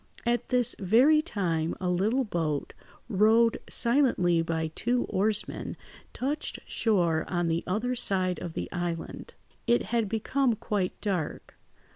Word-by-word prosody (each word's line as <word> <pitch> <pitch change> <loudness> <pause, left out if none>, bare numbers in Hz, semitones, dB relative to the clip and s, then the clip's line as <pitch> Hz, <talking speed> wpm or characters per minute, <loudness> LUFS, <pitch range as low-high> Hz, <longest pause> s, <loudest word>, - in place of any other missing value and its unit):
At 240 0 0
this 245 -1 +4
very 245 +11 +4
time, 170 - -2
a 185 - -3
little 205 +9 +1
boat, 165 - -2 0.3
rowed 225 +2 +3
silently 235 -10 +2
by 160 -1 -2
two 245 +6 0
oarsmen, 210 +2 0 0.3
touched 285 +4 -3
shore 175 -8 +1
on 175 -2 -1
the 165 +1 -1
other 220 +7 -1
side 185 -6 0
of 170 - -6
the - - -4
island. 175 -2 -5 0.3
It 240 - +3
had 230 -4 +1
become 240 +3 0
quite 205 -4 -3
dark. 185 -7 -3
205 Hz, 130 wpm, -28 LUFS, 175-240 Hz, 0.3 s, this